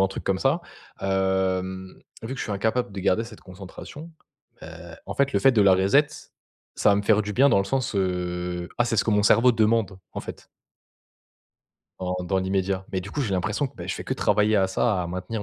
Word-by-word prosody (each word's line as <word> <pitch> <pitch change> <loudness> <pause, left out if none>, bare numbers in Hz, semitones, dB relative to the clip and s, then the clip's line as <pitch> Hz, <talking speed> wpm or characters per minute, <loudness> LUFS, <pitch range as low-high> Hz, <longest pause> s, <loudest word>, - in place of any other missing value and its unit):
ou - - +5
un 95 - +3
truc 95 - -7
comme 95 -1 0
ça, 135 +6 +2 0.4
hem, 95 -1 -1 0.2
vu 115 +4 -5
que - - -9
je - - -2
suis - - -5
incapable 110 +4 -1
de 100 - -7
garder 95 +3 +2
cette 115 -2 -11
concentration, 95 - -11 0.5
ben, 80 +1 -11
en 100 - -5
fait 140 0 +1
le - - +2
fait 135 - +5
de 110 -4 +4
la 95 -1 +6
reset, 100 +11 +4 0.7
ça - - +3
va 100 - +4
me 100 - 0
faire 105 0 +3
du 105 0 -5
bien 135 +7 +5
dans 100 - +4
le 100 - +1
sens, 130 +2 -2
heu 90 -2 -2
«Ah 120 - +4
c'est 115 -1 -1
ce - - +2
que - - 0
mon 105 -1 +3
cerveau 120 +4 +5
demande» 110 -3 +1
en - - -5
fait - - -10 1.5
en 90 0 -2
dans 95 +2 0
l'immédiat. 95 0 -1
Mais 95 - -1
du 95 +2 -9
coup, 145 - -3
j'ai 105 -6 -2
l'impression 105 +9 -1
que, - - -15
beh, - - -8
je - - -1
fais - - -7
que - - -2
travailler 105 +1 +2
à 95 -1 +2
ça, 95 -1 0
à 85 - -4
maintenir 95 +5 -4
100 Hz, 235 wpm, -25 LUFS, 95-115 Hz, 1.5 s, la